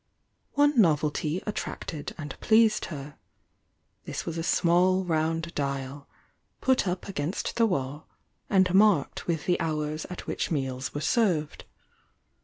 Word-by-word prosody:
One 290 -3 +4
novelty 155 0 +1
attracted 165 -7 -5
and 150 -2 -6
pleased 220 -1 +4
her, 145 -3 -8 0.4
— - - -46
this - - -5
was 165 - -4
a 165 - -2
small 180 +3 +3
round 165 0 -1
dial, 140 0 -3 0.5
put 260 -6 +2
up 180 +1 -3
against 175 -2 -3
the 230 -1 +4
wall, 140 -4 -3 0.4
and 190 -2 +3
marked 195 -7 +3
with 165 -3 -1
the 180 - +1
hours 155 -1 -2
at 180 - -7
which - - -2
meals 135 -4 -3
were 145 - -2
served. 175 - 0
165 Hz, 135 wpm, -27 LUFS, 150-190 Hz, 0.5 s, One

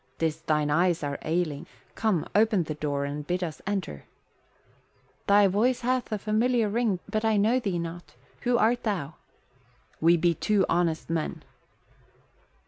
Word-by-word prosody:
"'Tis 160 -1 -1
thine 150 -2 0
eyes 170 +1 +2
are 140 -1 -3
ailing. 160 -1 -2 0.3
Come, 205 -8 0
open 210 -3 +3
the 155 - -4
door 145 -2 -2
and 145 +1 -5
bid 180 +1 -1
us 160 -4 -5
enter." 190 - -3 1.2
"Thy 200 0 +6
voice 220 +7 +2
hath 250 0 -1
a 215 - 0
familiar 220 +2 +1
ring 220 -3 +1
but 215 0 -2
I 220 -1 +2
know 220 +5 +3
thee 195 -7 -2
not. 170 +1 -7 0.2
Who 245 -1 +1
art 240 +2 +2
thou?" 180 -9 -2 0.9
"We 170 +2 +5
be 170 +1 +2
two 200 +3 +1
honest 165 -2 0
men." 165 -2 -3
180 Hz, 150 wpm, -27 LUFS, 160-215 Hz, 1.2 s, Thy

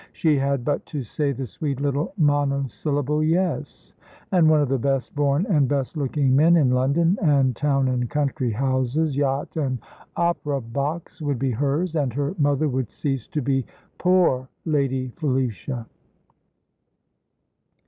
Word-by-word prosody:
She 155 -3 +2
had 135 -2 0
but 145 - 0
to 145 -4 -4
say 140 +5 -1
the 135 0 -4
sweet 135 +4 -4
little 145 +3 -1
monosyllable 145 -1 0
"yes," 155 - -1 0.4
and 170 -4 +5
one 155 -1 +5
of 145 - +2
the 135 0 0
best 135 +1 -1
born 145 +4 +2
and 150 - +3
best 140 +2 -1
looking 140 -2 +1
men 160 +5 +5
in 135 -6 +3
London, 145 +9 +2
and 140 - +3
town 140 -1 +1
and 125 -2 -1
country 145 -3 -1
houses, 130 +5 0
yacht 140 0 -1
and 135 -4 0 0.4
opera 160 -5 0
box, 140 +8 -4
would 145 -3 -1
be 130 +1 0
hers; 145 +8 -1
and 140 -6 0
her 140 +4 -1
mother 145 +1 +2
would 130 -4 -2
cease 135 -5 -3
to 150 - -3
be 135 0 +1 0.4
"poor 175 -9 +2 0.2
Lady 135 -5 0
Felicia." 130 - -2
140 Hz, 150 wpm, -23 LUFS, 130-150 Hz, 0.4 s, and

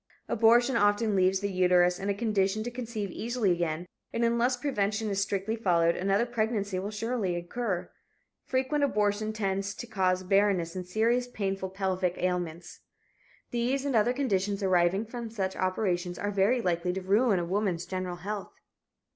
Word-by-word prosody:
Abortion 235 +3 +4
often 205 0 +2
leaves 190 0 +3
the 200 0 -1
uterus 180 -1 +3
in 195 - -3
a - - +2
condition 210 -1 0
to 240 - -4
conceive 230 -5 -4
easily 230 -2 0
again 170 -1 -1 0.3
and 235 - 0
unless 235 +2 +2
prevention 215 -5 -1
is 195 0 0
strictly 200 +2 -1
followed 170 -6 +2
another 195 +4 +1
pregnancy 215 -5 -1
will 195 +2 -4
surely 215 -3 -2
occur. 180 +2 -3 0.6
Frequent 265 +3 0
abortions 215 -3 0
tend 195 -2 0
to 200 +4 -5
cause 185 -5 0
barrenness 190 -3 +2
and 180 -1 -5
serious, 230 +6 +1
painful 195 -5 -3
pelvic 185 -2 -1
ailments. 175 -2 -3 0.7
These 250 +3 0
and 275 -3 0
other 225 +2 +4
conditions 205 -7 -1
arising 185 +2 +2
from 235 0 -6
such 195 -4 -3
operations 185 -2 -1
are 205 - -2
very 205 +5 +2
likely 180 0 0
to 190 - -3
ruin 205 +2 +3
a 175 - -1
woman's 185 -2 -1
general 185 -1 -4
health. 200 +3 -6
200 Hz, 160 wpm, -29 LUFS, 185-230 Hz, 0.7 s, Abortion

